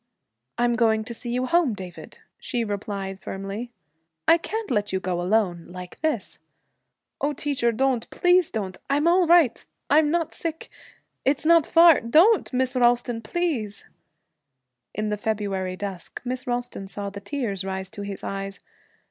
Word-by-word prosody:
'I'm 240 0 +2
going 220 -2 +3
to 235 +2 -6
see 240 +1 -5
you 250 +1 0
home, 300 -5 +2
David,' 185 -3 -10 0.2
she 240 -3 -2
replied 200 -2 -4
firmly. 195 +6 -5 0.6
'I 335 - +6
can't 440 +1 -4
let 210 -3 0
you 190 - 0
go 180 -1 -2
alone 180 -3 +1
like 180 0 -10
this.' 315 -1 -2 0.8
'Oh, 290 +1 +1
teacher, 270 -4 0
don't, 255 0 0
please 355 -1 +3
don't! 190 -5 -4
I'm 290 +3 +2
all 355 0 +4
right 335 -8 +4 0.3
I'm 300 +1 +5
not 330 0 0
sick, 325 -1 -5 0.5
it's 285 +3 +1
not 335 -1 +5
far 335 -2 +7
Don't, 335 - +4
Miss 255 0 0
Ralston, 240 -1 +2
please!' 230 - -2 1.1
In 215 +1 -1
the 210 - -1
February 200 -3 -2
dusk, 190 -2 -6
Miss 250 +1 -3
Ralston 245 -5 -3
saw 200 0 -5
the 200 0 -8
tears 205 -4 -3
rise 190 0 -4
to 205 - -7
his 200 -1 -6
eyes. 195 0 -5
235 Hz, 155 wpm, -25 LUFS, 200-290 Hz, 1.1 s, far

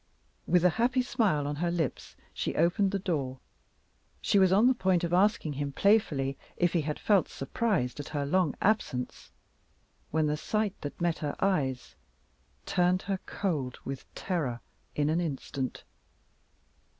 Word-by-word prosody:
With 180 0 +4
a - - +7
happy 250 +1 +3
smile 210 - +1
on 145 0 -3
her 175 +3 0
lips 170 -6 -3 0.2
she - - -3
opened 175 +5 +3
the 200 - -1
door. 145 -9 -2 0.8
She 200 - +2
was 190 -1 +5
on 205 +5 +5
the 260 - +6
point 190 -7 +1
of 170 0 -1
asking 185 -5 +3
him 140 0 -3
playfully 140 -8 +2 0.2
if 175 -1 +2
he 170 - +2
had 150 0 -3
felt 200 -6 +3
surprised 135 - -1
at 145 - -5
her 145 -2 -2
long 170 0 +1
absence 190 - 0 0.8
when 155 0 +1
the 150 0 0
sight 215 +4 -1
that 145 - -6
met 170 -1 0
her 150 -3 -3
eyes 140 -10 0 0.7
turned 180 +1 +2
her 195 0 -2
cold 145 -10 -2
with 135 -1 -6
terror 150 -10 -2 0.4
in 145 -1 +1
an 165 +2 +1
instant. 135 -4 -4
170 Hz, 155 wpm, -29 LUFS, 145-195 Hz, 0.8 s, a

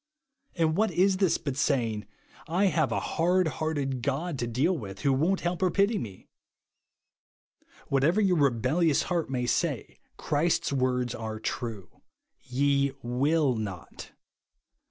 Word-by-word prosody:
And 160 -2 +1
what 215 +3 +2
is 190 +1 +2
this 190 -3 +2
but 140 -3 -4
saying, 120 -7 0 0.2
" - - -22
I 180 +6 +2
have 155 0 +1
a - - +1
hard 180 +2 +1
hearted 145 -4 -2
God 140 +4 -2
to 120 - -1
deal 135 +11 +1
with, 100 - -7
who 135 -1 +2
w^on't 175 +8 +1
help 175 +1 -2
or 185 - +3
j^ity 200 +3 +2
me 95 -4 -7
T - - -25 1.6
Whatever 145 +9 +3
^'•our 185 -6 +3
rebellious 140 +5 +2
heart 170 -5 -1
may 125 -2 -1
say, - - -1 0.2
Christ's 155 +2 0
w^ords 125 -2 0
are 110 -1 -5
true, 110 -3 -5 0.2
" - - -54
Ye 140 +1 +1
will 135 +4 +2
not." 100 -6 -7
140 Hz, 150 wpm, -28 LUFS, 125-170 Hz, 1.6 s, or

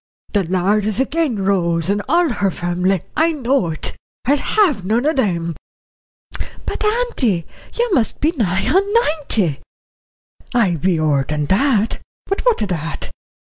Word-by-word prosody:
The 200 -3 +2
Lord 190 +4 +1
is 215 0 0
agin 270 -8 0
Rose 170 -4 +1
and 205 +1 +1
all 340 +3 +4
her 205 -5 0
family, 180 +1 -1
I 325 +1 +3
know 265 - +1
it. 155 -1 -2 0.3
I'll 280 +3 +4
have 320 - +2
none 225 +7 +1
of 310 - +2
them." 170 -8 0 1.1
"But, - - -3
auntie, 425 - +1 0.3
you 475 -3 0
must 235 - +1
be 310 - +2
nigh 190 - 0
on 390 +7 +2
ninety." 290 - +1 1.0
"I 195 -8 +3
be 170 +2 +1
ower 150 -3 +2
that. 200 - +1 0.3
But 390 - -2
what 465 - +3
o' - - +1
that? 165 -5 -4
210 Hz, 145 wpm, -19 LUFS, -, 1.1 s, all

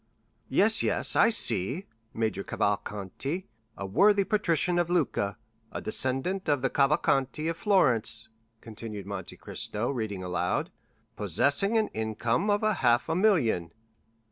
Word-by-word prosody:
"Yes, - - +3
yes, - - +1
I 225 - +5
see. 130 - 0 0.3
'Major 110 -4 -2
Cavalcanti, 105 - -3 0.3
a 100 - -5
worthy 200 - +4
patrician 175 -4 +1
of 175 -1 0
Lucca, 145 - 0 0.3
a - - -4
descendant 135 - -1
of 145 -3 +1
the 135 - +1
Cavalcanti 140 +1 +1
of 165 - -1
Florence,'" 125 - +1 0.3
continued 110 -2 -8
Monte 100 -3 -7
Cristo, 110 +5 -3
reading 110 -7 -4
aloud, 90 0 -1 0.4
"'possessing 195 +10 +1
an 220 - +1
income 110 - -1
of 205 +1 +1
half 125 - +2
a 160 - +1
million. 140 - +2
130 Hz, 125 wpm, -28 LUFS, -, 0.4 s, I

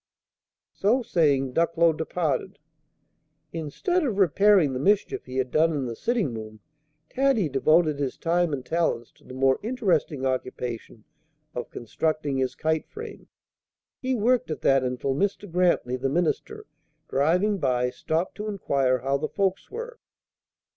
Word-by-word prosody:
So 240 +6 +2
saying, 140 - +2
Ducklow 165 +1 +3
departed. 160 -3 -2 1.0
Instead 165 - -1
of 235 -9 -1
repairing 195 -4 +4
the 130 - -2
mischief 205 +8 +1
he 130 0 -6
had 130 -1 -1
done 160 +2 +3
in 140 -3 -2
the 115 -2 -4
sitting 220 - -1
room, 110 -1 -8 0.5
Taddy 265 - +2
devoted 155 +2 +3
his 135 -3 -2
time 175 0 +1
and 130 -3 -4
talents 165 -8 -1
to - - -27
the 130 - -11
more 135 0 +3
interesting 180 - 0
occupation 125 -4 -4 0.5
of 125 - -5
constructing 145 +3 -2
his 130 -1 -1
kite 160 0 -1
frame. 445 -1 -9 0.7
He 260 -1 0
worked 240 0 +2
at 155 - -4
that 135 -1 +3
until 125 +2 -1
Mr. 200 +6 -1
Grantly, 170 -8 +1
the 135 +1 -1
minister, 170 +3 -1 0.4
driving 180 +9 +2
by, 125 -4 +1
stopped 165 +6 -2
to 210 +1 -4
inquire 140 -10 +1
how 135 +1 +1
the 155 +2 -3
folks 195 -1 -1
were. 470 +2 -7
160 Hz, 145 wpm, -26 LUFS, 130-195 Hz, 1.0 s, repairing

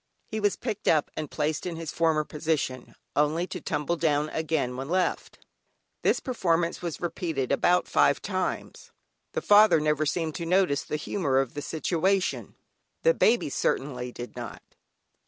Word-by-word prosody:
He 220 - -4
was 205 -2 +2
picked 220 -3 -5
up 155 -2 +3
and 155 -1 -4
placed 155 +2 -2
in 170 - -4
his 165 -2 -5
former 160 -2 +2
position, 150 -4 -3 0.2
only 150 +4 +2
to 180 -1 -7
tumble 150 +5 -1
down 150 -2 +1
again 155 -6 -1
when 135 +3 -5
left. 185 +1 -1 0.6
This - - +2
performance 170 -9 0
was 170 -3 -4
repeated 165 -6 -2
about 175 +6 +3
five - - +3
times; - - -4 0.4
the - - -2
father 210 -4 +7
never 150 0 +1
seemed 160 0 -1
to 170 - -4
notice 180 -5 +3
the - - -4
humour 145 -2 -1
of 135 -2 +1
the 145 - -4
situation 180 +5 0 0.5
the - - +5
baby 230 - +2
certainly 125 -3 -1
did 120 0 -8
not. - - -7
160 Hz, 155 wpm, -27 LUFS, 145-180 Hz, 0.6 s, father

